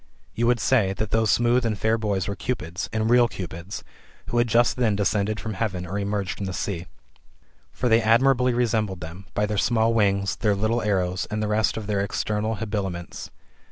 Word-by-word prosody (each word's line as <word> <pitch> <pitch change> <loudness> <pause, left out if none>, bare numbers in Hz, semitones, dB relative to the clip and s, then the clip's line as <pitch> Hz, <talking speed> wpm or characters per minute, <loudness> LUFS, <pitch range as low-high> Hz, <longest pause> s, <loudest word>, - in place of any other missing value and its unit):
You 120 +1 0
would 120 -1 +3
say, 105 -8 +2
that 105 +2 -4
those 110 -1 +2
smooth 120 +3 +3
and 110 -3 -1
fair 110 +2 +2
boys 100 -5 -1
were 100 - -3
Cupids, 90 -9 -4
and 110 -1 0
real 120 +1 +5
Cupids, 90 -2 -7 0.5
who 120 - +1
had 120 - +3
just 120 +2 +3
then 115 -5 +2
descended 105 +1 0
fiom 110 0 -5
heaven, 95 -3 -2
or 95 +4 -3
emerged 100 -1 -2
from 100 - -4
the 95 - -4
sea. 90 -2 -3 0.8
For 125 - -2
they 115 0 +4
admirably 125 +3 +4
resembled 110 -6 0
them, 90 +4 -9
by 105 - +2
their 105 -1 -1
small 115 +2 +2
wings, 100 -3 +1
their 105 -2 +1
little 110 +4 0
arrows, 95 -3 0
and 105 0 -2
the - - 0
rest 105 0 +1
of 110 - -4
their 100 -1 -1
external 105 +2 -1
habiliments. 100 -5 -4
105 Hz, 195 wpm, -24 LUFS, 100-115 Hz, 0.8 s, real